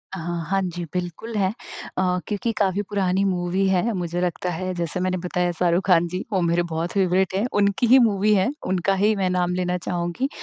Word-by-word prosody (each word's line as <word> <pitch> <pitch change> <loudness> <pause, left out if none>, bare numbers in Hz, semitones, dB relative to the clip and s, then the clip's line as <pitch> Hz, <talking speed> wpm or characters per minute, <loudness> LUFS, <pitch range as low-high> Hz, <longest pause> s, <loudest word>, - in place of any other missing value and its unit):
अहा! 175 -1 -4 0.2
हाँ 195 0 +2
जी, 175 - -4
बिल्कुल 180 +5 -4
है। 190 -2 +2 0.5
अ, 180 -1 +1
क्योंकि 210 +2 -1
काफ़ी 195 -1 +1
पुरानी 195 -2 +1
मूवी 185 +1 0
है, 190 +5 +2
मुझे 175 -2 -2
लगता 180 0 -1
है 185 +2 -3
जैसे 170 0 -1
मैंने 185 0 0
बताया 180 0 0
शाहरुख 175 +1 +2
खान 175 -2 +4
जी, 185 +3 -4
वो 190 - +2
मेरे 170 0 +2
बहुत 165 +2 -2
फ़ेवरेट 190 -1 +1
हैं। 200 +4 +1 0.2
उनकी 200 +4 +2
ही 260 +3 +7
मूवी 210 0 +2
है। 190 +2 +2 0.2
उनका 185 +1 +1
ही 215 +1 +4
मैं 190 -2 0
नाम 180 -1 0
लेना 180 0 -1
चाहूँगी। 175 +8 -2
185 Hz, 200 wpm, -23 LUFS, 175-195 Hz, 0.5 s, ही